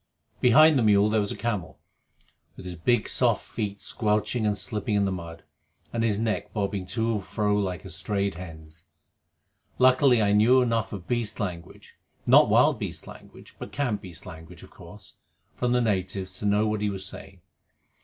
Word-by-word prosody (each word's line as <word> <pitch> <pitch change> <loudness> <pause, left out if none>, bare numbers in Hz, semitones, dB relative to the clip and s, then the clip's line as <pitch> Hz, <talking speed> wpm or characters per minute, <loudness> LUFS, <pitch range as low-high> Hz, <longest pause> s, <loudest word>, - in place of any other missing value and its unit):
Behind 150 +4 +6
the - - +2
mule 105 -1 +4
there 110 - +2
was 100 -1 -1
a - - -6
camel, 105 -7 -3 0.8
with - - -11
his 90 - -5
big 110 +7 +1
soft - - +2
feet 100 -1 -4
squelching 105 +2 -1
and 105 -1 0
slipping 105 +2 -1
in 100 -1 +2
the 95 - -1
mud, 85 -2 -7 0.5
and 115 -1 -1
his 110 -3 +1
neck 110 0 -2
bobbing 100 -2 -2
to 115 +2 -1
and 105 -3 -2
fro 105 +2 -1
like 95 -4 -2
a - - -8
strayed 100 -1 -2
hen's. 80 -2 -11 0.9
Luckily, 130 -1 +5
I 105 -2 +2
knew 115 +5 +5
enough 115 -2 -1
of 95 -4 -8
beast 115 -3 -2
language 90 -5 -7 0.3
not - - +6
wild - - +4
beast - - -5
language, - - -14
but - - -8
camp 120 -8 -2
beast 90 -3 -10
language, 80 +1 -11
of - - -15
course - - -13 0.4
from 125 -1 -1
the 125 0 +2
natives 95 -3 -2
to 105 - -2
know 105 +1 +2
what 105 -1 -2
he 105 - 0
was 95 -1 -3
saying. 95 -1 -8
105 Hz, 185 wpm, -26 LUFS, 95-115 Hz, 0.9 s, Behind